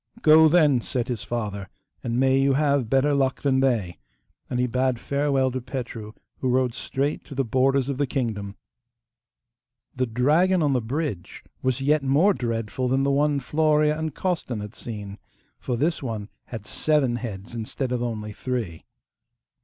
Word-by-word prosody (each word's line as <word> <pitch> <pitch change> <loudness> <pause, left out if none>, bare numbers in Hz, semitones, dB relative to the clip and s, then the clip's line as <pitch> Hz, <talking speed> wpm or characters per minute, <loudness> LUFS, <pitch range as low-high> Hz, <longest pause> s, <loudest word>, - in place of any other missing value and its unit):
'Go, 160 0 +8
then,' 150 -6 +4
said 125 +1 -3
his 120 -4 -3
father, 100 -5 -4 0.3
'and 120 +1 -1
may 135 0 +4
you 135 0 +3
have 140 -4 +1
better 135 +3 +3
luck 135 -2 0
than 135 -2 +3
they'; 115 -10 0 0.5
and 125 - -1
he 125 - +3
bade 125 0 0
farewell 140 -1 +1
to 130 +1 -3
Petru, 120 -4 -6 0.3
who 130 - 0
rode 125 -1 +2
straight 135 +4 -2
to 140 - -10
the 135 0 0
borders 130 +3 +2
of 140 -1 -3
the 145 - +1
kingdom. 110 -7 -3 1.4
The 130 0 0
dragon 155 +10 +3
on 145 -2 +2
the 125 - +1
bridge 125 - -4 0.2
was 130 0 0
yet 150 +2 +3
more 145 +9 +4
dreadful 115 - -2
than 135 +2 +2
the 140 - +2
one 145 +1 +2
Florea 150 +2 +2
and 160 -2 -4
Costan 170 - -2
had 105 +1 -7
seen, 105 -5 -7 0.4
for 125 -2 -2
this 155 +6 0
one 110 -5 -4 0.2
had 110 -4 -8
seven 140 -5 +1
heads 110 -3 -7
instead 120 +3 -4
of 125 -1 -1
only 110 -3 -4
three. 110 -10 -4
130 Hz, 170 wpm, -25 LUFS, 115-140 Hz, 1.4 s, Go